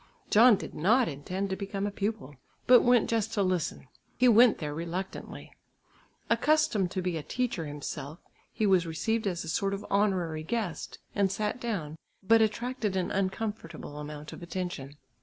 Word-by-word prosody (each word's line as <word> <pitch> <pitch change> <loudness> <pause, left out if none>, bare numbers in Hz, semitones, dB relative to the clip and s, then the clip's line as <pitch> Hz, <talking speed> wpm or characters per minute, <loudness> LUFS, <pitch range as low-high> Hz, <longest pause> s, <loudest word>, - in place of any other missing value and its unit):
John 230 +2 +7
did - - -7
not 220 +10 +3
intend 185 +7 -4
to - - 0
become 195 0 -4
a 205 - -2
pupil, 200 -8 -3 0.3
but 250 -1 +8
went 245 -2 +4
just 225 -2 -1
to 200 - +2
listen. 185 -7 -1 0.3
He 250 - +4
went 235 0 +6
there 150 -2 -4
reluctantly. 170 +4 -6 0.8
Accustomed 300 - +2
to 185 +1 -3
be 175 -2 -1
a - - -3
teacher 225 -4 -2
himself, 145 +1 -6 0.3
he 215 - -1
was 185 -4 +3
received 220 +7 -1
as 175 -3 -2
a - - -9
sort 195 +5 0
of 200 - -8
honorary 185 -6 +1
guest, 200 0 -3 0.2
and 200 -2 +2
sat 210 +4 -2
down, 165 -10 -3 0.2
but 225 +3 +5
attracted 220 -1 -1
an 185 -2 -1
uncomfortable 195 -6 -3
amount 150 0 -7
of - - -10
attention. 170 -5 -5
195 Hz, 165 wpm, -29 LUFS, 165-220 Hz, 0.8 s, but